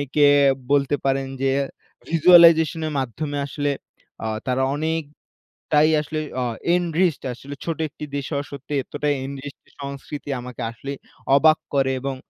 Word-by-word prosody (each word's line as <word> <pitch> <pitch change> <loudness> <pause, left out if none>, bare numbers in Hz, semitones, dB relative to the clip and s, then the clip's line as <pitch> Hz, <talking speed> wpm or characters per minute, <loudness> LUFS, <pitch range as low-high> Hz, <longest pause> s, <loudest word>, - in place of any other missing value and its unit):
কে 145 -1 +6 0.4
বলতে 145 0 +3
পারেন 135 0 +1
যে 135 - +2 0.6
ভিজুয়ালাইজেশন 165 -1 +6
এর 155 - -4
মাধ্যমে 145 +4 -3
আসলে 145 0 -1 0.5
আ - - -1 0.2
তারা 130 +1 +1
অনেকটাই 155 -1 -4 0.7
আসলে 155 +1 -4 0.2
আ - - 0 0.3
এনরিচড 175 -2 +1
আসলে 140 +4 -9
ছোট 165 -1 -3
একটি 150 +1 -9
দেশ 140 - -3
হওয়া 145 0 -2
সত্বে 140 +1 -7
এতটাই 145 +2 -1
এনরিচড 140 +1 -9 0.2
সংস্কৃতি 140 +1 -7
আমাকে 125 0 -8
আসলেই 140 +4 -7 0.4
অবাক 155 +2 +5 0.2
করে 135 -1 +2
এবং 135 -1 -3
145 Hz, 135 wpm, -23 LUFS, 135-155 Hz, 0.7 s, কে